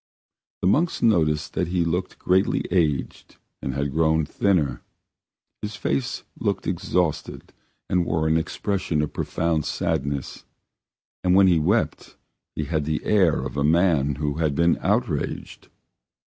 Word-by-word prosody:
The - - +3
monks 160 - +1
noticed 80 -9 +2
that - - -1
he 85 -1 0
looked 90 +3 -2
greatly 95 +2 +2
aged 80 -7 -1 0.3
and 65 -1 -3
had 70 0 -1
grown 80 +1 +2
thinner; 75 -7 0 0.8
his 105 0 -5
face 120 +6 -2 0.2
looked 100 -3 -1
exhausted 90 -2 -2 0.3
and 90 -1 +2
wore 80 -2 0
an 80 - +2
expression 85 -1 -1
of 75 - -4
profound 80 -2 -1
sadness, 70 -2 -2 0.8
and 90 0 +3
when 95 0 +7
he 90 -3 +4
wept 75 - -1 0.4
he 75 - -2
had 75 0 -1
the 75 0 -2
air 95 -7 +3
of - - -6
a 70 - +1
man 80 -3 +3
who 75 +1 -2
has 80 -3 +1
been 85 +4 +2
outraged. 100 - -2
85 Hz, 140 wpm, -24 LUFS, 75-95 Hz, 0.8 s, when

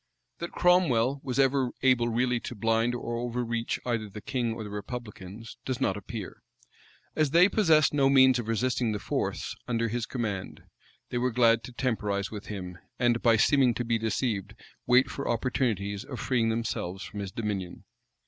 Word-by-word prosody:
That 170 - -5
Cromwell 140 -8 +3
was 130 -2 -3
ever 135 -1 +3
able 125 -3 +4
really 120 +1 +1
to 120 - -7
blind 115 +3 +1
or 120 -1 -4
overreach 120 -1 -2
either 115 -4 -1
the 105 - -8
king 120 +1 -2
or 115 - -6
the 105 - -8
republicans, 105 -1 -7
does 130 -1 -3
not 95 -8 +1
appear: 105 0 -7 0.7
as 155 -2 +2
they 170 +5 +6
possessed 160 -9 +4
no 140 -2 +4
means 130 -2 +6
of 115 - -5
resisting 115 0 0
the - - -1
force - - -3
under 115 -1 0
his 120 +1 -2
command, 105 -7 -4 0.5
they 120 - 0
were 125 +1 +1
glad 115 -1 +3
to 125 - -9
temporize 105 -6 -1
with 105 -2 -7
him, 90 -4 -6 0.2
and, 120 -1 +2
by 115 -2 +4
seeming 130 +1 +4
to 120 - -2
be 115 -1 +1
deceived, 105 -2 -2 0.3
wait 125 +2 +5
for 140 - -4
opportunities 110 -5 -1
of 130 - -7
freeing 120 -3 +1
themselves 110 -5 -3
from 105 - -7
his 100 -2 -4
dominion. 100 -4 -4
115 Hz, 175 wpm, -28 LUFS, 105-130 Hz, 0.7 s, they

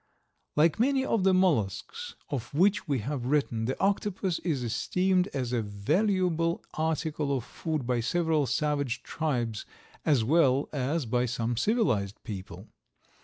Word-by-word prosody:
Like 160 +6 +3
many 265 +2 +2
of 225 -7 +1
the 190 - +5
mollusks 185 - 0 0.2
of 125 -5 -3
which 195 +5 +3
we 140 -5 0
have 130 0 -3
written 130 -6 +1
the 130 - -2
octopus 195 -2 0
is 150 -8 -1
esteemed 180 - +1
as 125 -8 -3
a 120 - +1
valuable 165 - 0
article 155 -3 -1
of 125 - -5
food 155 +1 -4
by 125 -1 +1
several 160 +3 +1
savage 140 0 -1
tribes 120 -9 -2 0.4
as 140 -7 +3
well 140 0 +3
as 145 +2 -1
by 125 +2 +1
some 115 0 -1
civilized 120 - +1
people. 95 -3 -7
150 Hz, 140 wpm, -28 LUFS, 120-180 Hz, 0.4 s, the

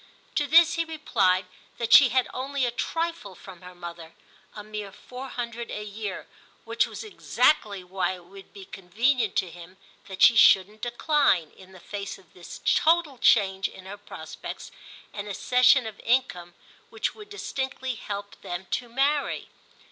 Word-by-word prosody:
To 290 - 0
this 330 +2 +6
he 335 - 0
replied 205 - +1 0.3
that 235 -1 0
she 275 -3 +9
had 255 +1 +1
only 270 +1 -2
a 240 - -1
trifle 330 - -3
from 185 -2 -13
her 180 0 -12
mother—a 175 +4 -12
mere 210 -1 -7
four 255 +6 -10
hundred 235 -1 -5
a 210 - -5
year, 205 -2 -6 0.4
which - - +1
was - - -8
exactly 215 - +1
why 185 0 -2
it 180 -1 -15
would 195 +2 -14
be 195 -1 -11
convenient 220 +6 0
to 180 - 0
him 175 +2 -13 0.3
that 190 -1 -1
she 235 - +8
shouldn't 210 0 +5
decline, 240 - +1
in 190 0 -17
the 190 - -14
face 200 +2 -6
of 185 -4 -23
this 175 -1 -11
total 320 -5 +3
change 190 -3 +3
in 190 - -13
her 195 +2 -7
prospects, 205 - -9 0.4
an 205 0 -6
accession 250 +5 +4
of 220 -2 -8
income 205 -9 0 0.3
which - - -2
would 420 -1 -13
distinctly 265 -9 -4
help 205 -2 -7
them 180 -1 -6
to 240 - -2
marry. 280 +4 0
210 Hz, 160 wpm, -26 LUFS, 190-260 Hz, 0.4 s, she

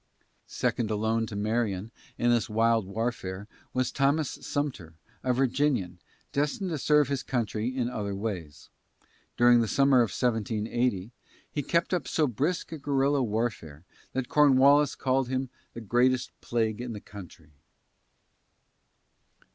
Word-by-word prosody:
Second 115 -3 -1
alone 110 +1 0
to 105 - -7
Marion 105 -1 -1 0.3
in 120 0 +2
this 120 -2 +1
wild 115 -1 +2
warfare 100 -2 -3 0.2
was 130 -1 0
Thomas 140 +1 +1
Sumter, 125 - -3 0.3
a 130 - 0
Virginian, 125 -8 0 0.3
destined 150 +6 -1
to 155 - -2
serve 150 0 +4
his 140 -1 -1
country 115 -3 -2
in 130 -1 -1
other 105 -5 -3
ways. 90 -8 -5 0.7
During 120 0 +6
the 115 - 0
summer 135 +3 +4
of 120 -3 +4
1780, 110 -1 -1 0.4
he 145 - -2
kept 170 +6 0
up 180 - -1
so 155 - +2
brisk 145 - -1
a 160 - -6
guerrilla 140 0 +1
warfare 105 - -3 0.3
that 130 -2 -2
Cornwallis 145 0 +5
called 130 -1 0
him 130 0 -2 0.3
"the 115 - -6
greatest 125 +3 +2
plague 115 -1 -1
in 125 -1 -5
the 105 - -6
country." 90 -7 -12
120 Hz, 135 wpm, -28 LUFS, 105-135 Hz, 0.7 s, During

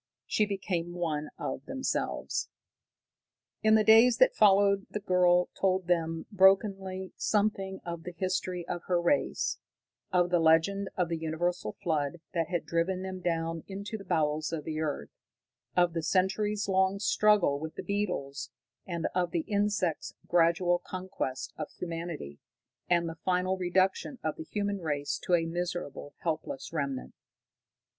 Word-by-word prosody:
She 215 - +1
became 180 -4 -2
one 155 -4 -2
of - - -4
themselves. 265 0 -2 1.1
In 220 0 +5
the 215 - +5
days 225 +3 +7
that - - +5
followed 200 -1 +4
the 210 - -3
girl 180 -2 +3
told 185 -1 +1
them 165 -2 0
brokenly 190 -1 +3
something 200 -2 0
of 170 -1 -5
the 180 +1 -8
history 185 -1 -2
of 175 - -3
her 180 -1 +2
race, 175 +12 +1 0.5
of 180 -1 +2
the 175 - +4
legend 165 +5 +3
of 180 -2 +2
the 165 -1 -2
universal 160 -6 -2
flood 155 -1 0
that 165 -2 0
had 175 -2 -2
driven 180 +3 0
them 190 -1 -5
down 165 -2 -2
into 200 +2 -6
the 205 - -6
bowels 155 -2 0
of 160 -3 -3
the 155 0 -4
earth, 145 - -3 0.7
of 175 -1 +4
the 165 - -1
centuries 200 +4 +1
long 190 0 +2
struggle 205 -7 +3
with 160 +1 -6
the - - -5
beetles, 180 -9 -2 0.4
and 170 -2 -3
of 180 -1 +1
the 170 - 0
insects' 205 -5 -1
gradual 175 +1 +3
conquest 180 -10 -5
of - - -4
humanity, 165 - -5 0.5
and 170 -1 +3
the 165 0 -7
final 185 0 +1
reduction 185 +7 +1
of 155 -1 -1
the 160 - -7
human 205 -1 -1
race 145 -3 -2
to 180 - +2
a 165 -1 +1
miserable, 175 -4 -4
helpless 155 -4 -3
remnant. 140 -4 -3
180 Hz, 150 wpm, -30 LUFS, 165-195 Hz, 1.1 s, days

